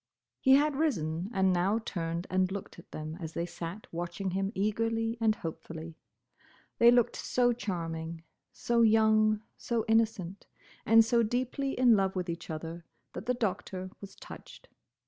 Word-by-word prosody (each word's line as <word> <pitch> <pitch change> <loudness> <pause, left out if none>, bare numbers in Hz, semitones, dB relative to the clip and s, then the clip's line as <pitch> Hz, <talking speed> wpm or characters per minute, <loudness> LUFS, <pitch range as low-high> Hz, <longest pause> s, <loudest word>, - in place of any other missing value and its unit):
He 265 - +5
had 295 +1 +3
risen, 180 - -1
and 190 -4 +2
now 185 +5 +2
turned 170 -5 -3
and 185 0 +2
looked 195 -3 -6
at - - -16
them 155 +1 -6
as 160 -2 -6
they 170 - -2
sat 175 +4 -7
watching 175 +3 -3
him 195 +2 -1
eagerly 225 +3 0
and 220 -1 +3
hopefully. 160 -1 -7 0.8
They 235 - +8
looked 240 -1 +4
so 245 -1 +1
charming, 165 -6 -4 0.3
so 235 0 0
young, 215 -1 +4
so 235 -2 -2
innocent, 220 -4 0 0.4
and 225 0 +7
so 235 +1 +3
deeply 255 +4 -1
in 245 -2 +6
love 195 -1 +1
with 180 -2 -2
each 170 +1 -8
other, 165 +2 -6 0.3
that 220 - -7
the 250 - +2
Doctor 185 -4 -3
was 195 -1 -10
touched. - - -12
195 Hz, 155 wpm, -30 LUFS, 170-225 Hz, 0.8 s, They